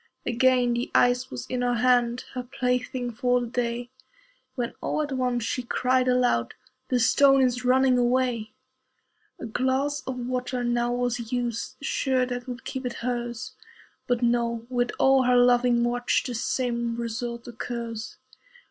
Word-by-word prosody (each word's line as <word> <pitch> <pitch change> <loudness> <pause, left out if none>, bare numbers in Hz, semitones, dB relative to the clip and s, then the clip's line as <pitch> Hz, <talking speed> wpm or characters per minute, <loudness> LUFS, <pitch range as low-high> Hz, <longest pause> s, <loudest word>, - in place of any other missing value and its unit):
Again 250 0 +3
the 240 +1 -2
ice 245 +1 +3
was 125 - -6
in 250 -1 -3
her 245 0 +1
hand, 245 0 +2
Her 255 - -3
plaything 250 -1 -2
for 245 +2 +1
the 245 - -3
day, 240 0 -3 0.6
When 240 -3 -3
all 305 - -1
at 290 - -5
once 250 -2 0
she 250 - -2
cried 255 +1 +1
aloud, 250 - +2 0.3
"The 250 - +2
stone 270 +3 +5
is 250 -1 0
running 255 0 +4
away." 245 -3 0 0.9
A - - -6
glass 265 +5 0
of 260 -1 -3
water 250 0 -2
now 240 0 0
was 245 -2 -2
used, 245 0 -2
Sure 260 -2 +1
that 245 0 -5
would 250 0 -7
keep 265 - -4
it 250 -1 -3
hers. 240 -2 -3 0.5
But 245 -1 0
no! 235 -1 +1
with 245 -1 +1
all 265 0 +5
her 250 -1 +3
loving 245 -1 +4
watch 245 0 +1
The 250 - -3
same 235 0 -1
result 235 0 -4
occurs. 235 -1 -6
245 Hz, 155 wpm, -26 LUFS, 240-255 Hz, 0.9 s, stone